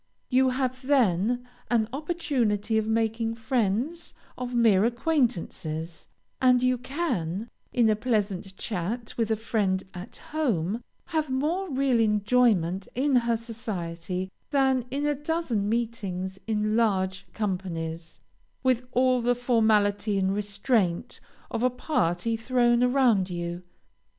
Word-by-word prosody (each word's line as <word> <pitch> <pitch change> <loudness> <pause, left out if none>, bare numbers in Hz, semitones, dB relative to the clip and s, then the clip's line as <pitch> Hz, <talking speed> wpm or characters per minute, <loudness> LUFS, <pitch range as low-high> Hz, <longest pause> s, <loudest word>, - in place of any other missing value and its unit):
You 260 +1 +4
have 255 0 -1
then 245 -3 +2 0.2
an 225 -3 +2
opportunity 250 - 0
of 215 - -2
making 225 0 0
friends 235 - -1 0.2
of 250 -1 -4
mere 220 -5 +5
acquaintances, 225 - -1 0.3
and 250 -1 +5
you 255 -1 +2
can, 235 - -2 0.2
in 235 -2 +3
a 215 - +4
pleasant 205 -4 -1
chat 220 +4 -3
with 225 -2 0
a 220 - +2
friend 205 -4 0
at 180 +5 -9 0.2
home, 230 - 0 0.3
have 315 -3 0
more 320 +9 -1
real 265 -3 +2
enjoyment 210 -4 +2
in 270 +2 +2
her 235 -1 +3
society 185 -5 -5 0.2
than 265 -3 +2
in 280 +3 -2
a 295 - +2
dozen 290 -8 -1
meetings 200 -5 -2
in 215 -1 0
large 195 -4 +1
companies, 170 -5 -4 0.4
with 255 -1 +1
all 255 0 +3
the 245 +1 +2
formality 215 -4 +2
and 190 0 +1
restraint 200 -2 0 0.3
of - - -2
a 255 - +4
party 230 - 0
thrown 240 +1 +2
around 245 -7 +3
you. 175 0 -4
225 Hz, 125 wpm, -27 LUFS, 195-255 Hz, 0.4 s, mere